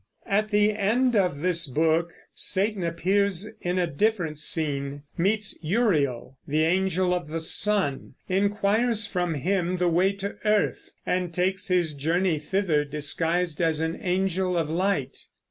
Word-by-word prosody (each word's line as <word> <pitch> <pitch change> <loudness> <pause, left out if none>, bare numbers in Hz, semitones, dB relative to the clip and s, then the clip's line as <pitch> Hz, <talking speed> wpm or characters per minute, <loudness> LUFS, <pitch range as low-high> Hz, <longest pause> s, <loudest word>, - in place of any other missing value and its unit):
At 210 +2 0
the 210 0 +3
end 230 +5 +1
of 180 -8 +1
this 170 -2 +2
book 160 +5 +1 0.2
Satan 200 0 +1
appears 190 +3 0
in 180 +1 -1
a 180 - +2
different 170 -2 -1
scene, 145 -3 -1
meets 210 +4 0
Uriel, 150 - 0
the 155 +2 +1
Angel 185 +1 +1
of 175 -3 -3
the 165 +2 -4
Sun, 165 -5 +1
inquires 205 +4 +1
from 175 -4 -2
him 180 +4 -1
the 180 0 +1
way 185 +4 +2
to 200 0 -6
earth, 210 -1 0 0.2
and 180 -1 -1
takes 185 +3 -1
his 175 -4 +1
journey 165 +3 0
thither 160 -1 0
disguised 160 +3 -1
as 160 -2 +1
an 160 +1 -1
angel 185 0 0
of 160 -2 -1
light. 170 -6 -2
180 Hz, 145 wpm, -25 LUFS, 160-200 Hz, 0.2 s, the